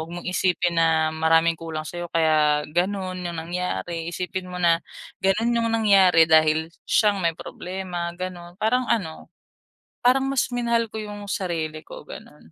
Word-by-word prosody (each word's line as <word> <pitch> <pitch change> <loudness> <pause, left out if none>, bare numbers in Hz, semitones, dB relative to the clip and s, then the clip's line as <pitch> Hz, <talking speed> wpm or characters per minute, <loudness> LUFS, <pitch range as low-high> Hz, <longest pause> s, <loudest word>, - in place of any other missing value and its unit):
huwag 160 - -6
mong 175 0 -7
isipin 180 -1 +1
na 160 -1 +2
maraming 165 +1 +3
kulang 160 -1 -6
sa'yo 175 +2 -6
kaya 155 -2 +3
gano'n 185 +1 -1
ang 170 -1 -4
nangyari, 170 - -3
isipin 180 +1 -4
mo 180 - -7
na, 170 -1 +3 0.4
gano'n 210 +5 +2
'yong 230 -1 +1
nangyari 195 -7 +5
dahil 160 0 +4 0.2
siya 210 -2 +4
ang 200 - -4
may 165 - +2
problema, 180 -1 -5
gano'n. 175 -1 -7
Parang 250 +4 +2
ano, 165 -8 -2 0.8
parang 265 +2 +4
mas 270 -2 +1
minahal 235 -1 0
ko 220 - -5
'yong 205 -1 -7
sarili 160 -4 -3
ko, - - -10
gano'n, 75 +2 -12
175 Hz, 160 wpm, -24 LUFS, 160-200 Hz, 0.8 s, nangyari